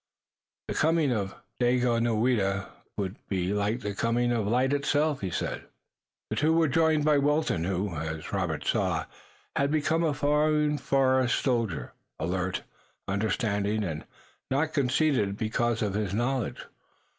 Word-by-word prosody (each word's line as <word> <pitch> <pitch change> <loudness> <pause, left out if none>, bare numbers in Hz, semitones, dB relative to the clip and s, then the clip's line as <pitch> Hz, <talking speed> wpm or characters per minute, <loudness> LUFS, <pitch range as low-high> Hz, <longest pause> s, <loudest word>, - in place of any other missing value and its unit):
"The - - -2
coming 160 -3 +2
of 100 -4 -2 0.2
Daganoweda 120 -5 +2 0.3
would 100 -1 -3
be 95 0 0
like 105 +4 0
the 105 - -3
coming 120 +4 +1
of 115 -4 0
light 130 +5 +2
itself," 145 +1 +1
he 95 - -2
said. - - -3 0.7
They 150 - +2
were 165 0 +4
joined 155 +1 +2
by 150 -2 +4
Wilton, 145 - +1
who, 95 +1 -1
as 80 0 -5
Robert - - -1
saw, - - +1 0.5
had 140 0 +2
become 155 +2 +1
a 155 -3 +1
fine 150 +1 +2
forest 130 -2 +2
soldier, 115 - -1 0.3
alert, 90 +3 -2 0.4
understanding 105 +1 0
and 80 -5 -4 0.5
not 150 +4 0
conceited 130 -7 +1
because 115 +1 0
of 100 -2 -1
his 100 -2 -1
knowledge. 120 +2 -1
120 Hz, 135 wpm, -28 LUFS, 100-145 Hz, 0.7 s, were